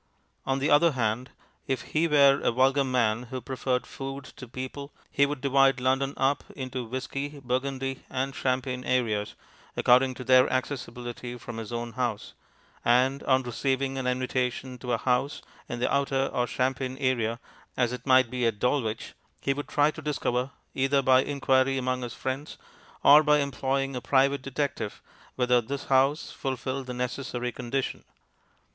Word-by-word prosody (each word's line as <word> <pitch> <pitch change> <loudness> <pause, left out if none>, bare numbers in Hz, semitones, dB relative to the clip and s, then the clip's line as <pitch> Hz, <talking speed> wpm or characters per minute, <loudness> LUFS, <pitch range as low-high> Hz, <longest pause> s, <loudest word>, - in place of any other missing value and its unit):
On 135 0 +1
the 140 +2 0
other 150 +2 +5
hand, 120 +1 -1 0.4
if 130 -3 -1
he 160 +2 +3
were 140 -3 +5
a - - +2
vulgar 135 +3 +3
man 125 -2 +1
who 130 0 -4
preferred 125 0 -2
food 135 +1 -6
to 130 - -9
people, 130 +4 -7 0.2
he 140 - +3
would 145 -2 -4
divide 135 -1 +4
London 135 +2 +1
up 135 +1 +1
into 130 -2 -4
whisky, 135 +4 -4
burgundy, 135 +1 -2
and 135 +1 -2
champagne 130 -1 -1
areas 115 -5 0 0.4
according 130 +1 +4
to 125 - -7
their 130 0 +5
accessibility 125 -2 -4
from 120 -1 -8
his 115 0 -6
own 120 0 -3
house; 120 -3 -3 0.5
and 130 +3 +3
on 130 0 +3
receiving 135 +2 -1
an 130 - -2
invitation 125 0 -1
to 125 0 -4
a 120 - +2
house 125 +4 0 0.3
in 120 - -3
the 125 - 0
outer 135 -1 +1
or 125 -1 +1
champagne 130 0 -1
area 120 -4 0 0.4
(as 125 -1 +1
it 125 - -7
might 130 -2 +5
be 125 -2 +1
at 110 -2 -1
Dulwich), 115 -2 -1 0.3
he 140 - 0
would 145 +1 -5
try 145 +1 +3
to 155 - -9
discover, 130 -4 -1 0.2
either 135 +1 +2
by 130 0 +6
inquiry 135 -1 +2
among 130 0 -1
his 120 -2 -5
friends 130 +3 -4 0.5
or 150 +2 +9
by 150 -1 +4
employing 135 -1 -1
a 125 - -3
private 140 +1 +2
detective, 135 -5 -3 0.4
whether 125 -1 +3
this 140 +5 -5
house 135 +3 +3
fulfilled 130 0 -4
the 125 - -4
necessary 125 0 -3
condition. 125 +2 -3
130 Hz, 165 wpm, -27 LUFS, 125-135 Hz, 0.5 s, or